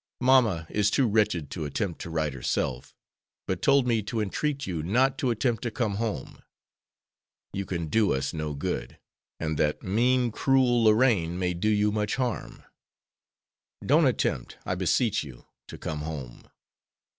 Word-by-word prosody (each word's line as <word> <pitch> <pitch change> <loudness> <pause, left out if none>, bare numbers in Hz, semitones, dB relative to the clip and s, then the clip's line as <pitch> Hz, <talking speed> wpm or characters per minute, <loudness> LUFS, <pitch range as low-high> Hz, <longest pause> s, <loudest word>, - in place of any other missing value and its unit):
Mamma 120 -10 +4
is 105 -1 +2
too 130 +4 +2
wretched 105 -9 +1
to 85 - -4
attempt 85 +5 -3
to - - -6
write 80 -3 -1
herself, 65 -1 -3 0.5
but - - -3
told 140 -2 +4
me 115 -3 +2
to 105 +2 -3
entreat 140 +7 -2
you 85 -4 -3
not 125 +11 +2
to 130 - +1
attempt 115 -1 0
to 120 - -2
come 110 -4 -2
home. 115 -1 -4 1.1
You 100 -1 -3
can 85 -2 -2
do 105 +6 +2
us 65 +1 -2
no 75 -2 -3
good, 70 - -4 0.4
and 80 -2 -2
that 75 0 0
mean, 120 +5 +2
cruel 125 -1 +3
Lorraine 105 -7 +3
may 90 -1 0
do 90 +5 0
you 105 0 +2
much 105 -1 -1
harm. 125 -3 -3 1.2
Don't - - +5
attempt, - - -1
I - - -1
beseech 95 +4 +1
you, 65 -5 -12 0.2
to - - -9
come 75 -1 -4
home. 75 -6 -7
105 Hz, 155 wpm, -27 LUFS, 80-120 Hz, 1.2 s, Don't